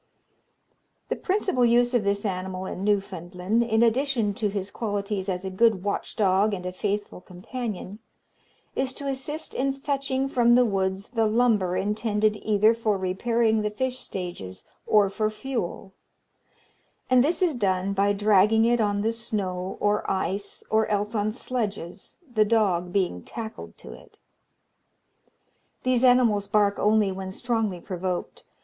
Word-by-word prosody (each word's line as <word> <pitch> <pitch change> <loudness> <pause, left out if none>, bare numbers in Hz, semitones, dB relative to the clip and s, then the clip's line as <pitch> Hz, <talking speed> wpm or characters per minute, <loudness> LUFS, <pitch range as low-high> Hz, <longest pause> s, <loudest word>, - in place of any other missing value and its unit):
The - - 0
principal 375 -9 0
use 240 +1 +4
of 240 -4 +2
this 200 +1 -1
animal 185 -1 -3
in 190 - -5
Newfoundland, 195 0 -1
in 225 -1 +2
addition 235 -3 +1
to 210 +1 -1
his 200 -1 -4
qualities 205 -3 -3
as 180 0 -3
a 190 - -3
good 205 -1 +3
watch 205 - -3
dog 200 0 +2
and 180 -1 -8
a 180 - -2
faithful 205 0 -3
companion, 200 +2 -6 0.8
is 265 -1 -1
to 280 - -5
assist 275 +4 -4
in 270 +1 0
fetching 275 -1 -1
from 240 -3 +4
the 250 0 +5
woods 195 -2 -1
the 225 -3 +2
lumber 215 -5 +2
intended 210 +1 0
either 215 +1 +3
for 220 -3 0
repairing 220 +4 +1
the 210 - 0
fish 255 +4 -2
stages, 95 - -7 0.2
or 210 -2 +5
for 215 +1 0
fuel; 215 -5 -5 1.1
and 255 -1 +5
this 340 +6 +1
is 345 -4 +2
done 195 -4 0
by 200 +1 +2
dragging 210 +2 +4
it 240 0 +3
on 205 -1 0
the 225 +1 +1
snow 195 -5 -3
or 210 0 0
ice, 195 +1 -2
or 220 0 +3
else 210 +1 -1
on 215 -1 0
sledges, 210 -7 -5 0.2
the 215 -2 +4
dog 195 -5 +1
being 180 - 0
tackled 225 - -8
to - - -11
it. - - -17 1.7
These 255 -1 +2
animals 240 -5 +4
bark 205 -1 +2
only 210 -1 +3
when 190 0 -5
strongly 220 -3 -2
provoked. 180 0 -4
210 Hz, 150 wpm, -25 LUFS, 195-235 Hz, 1.7 s, the